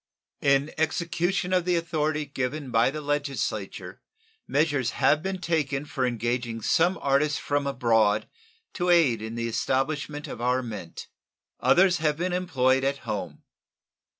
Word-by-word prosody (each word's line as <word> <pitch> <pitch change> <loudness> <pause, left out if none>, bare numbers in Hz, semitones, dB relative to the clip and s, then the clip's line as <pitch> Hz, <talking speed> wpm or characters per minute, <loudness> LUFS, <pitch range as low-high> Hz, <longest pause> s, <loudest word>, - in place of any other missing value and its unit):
In 140 +1 +2
execution 175 +3 0
of 180 -1 +3
the 180 0 +1
authority 155 -2 -1
given 135 0 -4
by 115 +2 +4
the 155 +2 -5
Legislature 145 -1 -3 0.5
measures 145 -4 +1
have 150 - +3
been 190 +2 -3
taken 150 -5 -1
for 130 -3 -1
engaging 120 -1 -2
some 175 +3 +2
artists 140 +1 +2
from 145 -1 -1
abroad 115 -5 +2 0.5
to 180 -1 -1
aid 150 -11 +4
in 110 +1 -6
the 115 0 -2
establishment 145 +5 -1
of 120 - -7
our 125 +1 +1
mint. 105 -8 -7 0.5
Others 185 0 +4
have 155 -2 0
been 175 +2 -1
employed 135 -8 +1
at 140 +1 -2
home. 90 -7 -5
140 Hz, 140 wpm, -26 LUFS, 125-160 Hz, 0.5 s, by